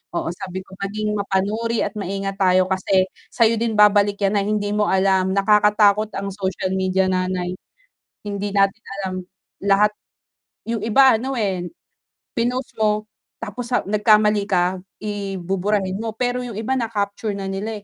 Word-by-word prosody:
oo, - - -1
sabi 185 +1 -6
ko, - - -23
"Maging 210 +1 -2
mapanuri 205 +3 -1
at 200 - -2
maingat 195 0 -3
tayo 185 -1 +4
kasi 190 0 +1 0.2
sa'yo 230 -1 +3
din 230 -2 -1
babalik 205 -1 +5
yan 200 +1 +1
na 200 - +3
hindi 205 0 -1
mo 210 -1 +2
alam 190 0 +2
nakakatakot 210 +1 +4
ang 200 0 -3
social 190 -1 -3
media, 190 0 +1
nanay 185 -1 -1 0.7
hindi 205 0 -3
natin 195 +3 +2 0.2
alam 185 - -3 0.5
lahat." 200 +1 +4 0.8
Yung 230 -3 -1
iba, 230 +1 +5
ano, 265 +3 -3
eh, 185 -4 -1 0.7
pinost 250 +2 -1
mo 215 -1 +1 0.4
tapos 235 +2 -5
sa 250 - 0
nagkamali 210 0 +3
ka, 180 0 +1 0.2
i 200 -2 -3
buburahin 190 +2 -1
mo, 225 -1 -4
pero 250 +1 -1
yung 240 -4 -6
iba 225 +4 -2
na-capture 205 -2 -2
na 195 - -5
nila, 210 +3 -4
205 Hz, 150 wpm, -21 LUFS, 190-215 Hz, 0.8 s, babalik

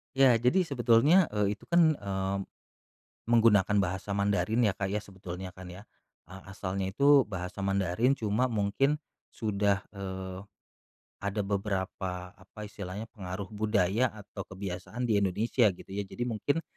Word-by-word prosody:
Iya, 130 -4 +6
jadi 125 +11 +3
sebetulnya, 140 +5 +4
eee, 105 -1 -1
itu - - -18
kan, 170 -2 +5
eee, 100 -6 -2 0.9
menggunakan 110 -3 +4
bahasa 95 0 -1
Mandarin 105 +4 +2
ya, 100 - +2
Kak, 95 0 -3
ya, 100 - 0
sebetulnya 95 -2 -7
kan 95 0 -10
ya. 95 +4 -11 0.4
Eee, 95 +3 -11
asalnya 95 0 -3
itu 140 +6 +5
bahasa 90 0 -5
Mandarin, 100 +7 +1
cuma 110 +3 0
mungkin 115 +7 +1 0.3
sudah, 100 -3 0
eee, 95 -1 -6 0.8
ada 100 +1 -2
beberapa, 95 -2 -3
apa 95 +3 -14
istilahnya, 105 +1 -7
pengaruh 95 -2 -6
budaya 105 +1 +1
atau 100 -1 -9
kebiasaan 95 +4 -6
di 110 -4 +2
Indonesia 105 +5 +2
gitu - - -15
ya, 100 0 -3
jadi 120 - -6
mungkin 145 +9 -1
100 Hz, 140 wpm, -29 LUFS, 95-115 Hz, 0.9 s, Iya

